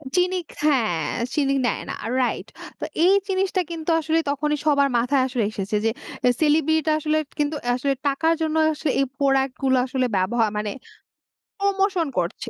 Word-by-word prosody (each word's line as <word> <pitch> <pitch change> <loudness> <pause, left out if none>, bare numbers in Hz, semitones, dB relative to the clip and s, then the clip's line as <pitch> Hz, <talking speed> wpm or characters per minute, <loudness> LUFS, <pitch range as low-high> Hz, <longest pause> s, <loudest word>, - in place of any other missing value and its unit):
চিনি 365 +1 +2 0.2
খ্যা 300 -1 +2 0.6
চিনি 275 -2 +1
নেয় 235 - 0
না - - -3 0.3
রাইট। 250 - -1 0.3
তো - - -3 0.2
এই 380 - +6
জিনিসটা 380 -1 0
কিন্তু 325 0 -5
আসলে 320 +1 +1
তখনই 295 +1 0
সবার 280 -2 +3
মাথায় 255 +3 +2
আসলে 245 -4 -1
এসেছে 200 0 -3
যে, 225 - +4 0.4
এ - - +6
সেলিব্রিটিরা 315 +1 +3
আসলে 310 +1 0 0.2
কিন্তু 295 +1 0 0.2
আসলে 275 +2 0
টাকার 320 +4 +2
জন্য 315 0 0 0.2
আসলে 305 -1 -2
এই 275 - +3
প্রোডাক্ট 270 -2 +2
গুলো 260 -1 +3
আসলে 255 0 -1
ব্যবহা 220 +5 +1
মানে 210 -1 -2 0.9
প্রমোশন 390 -4 +1
করছে 180 +7 -2
290 Hz, 160 wpm, -23 LUFS, 260-320 Hz, 0.9 s, এই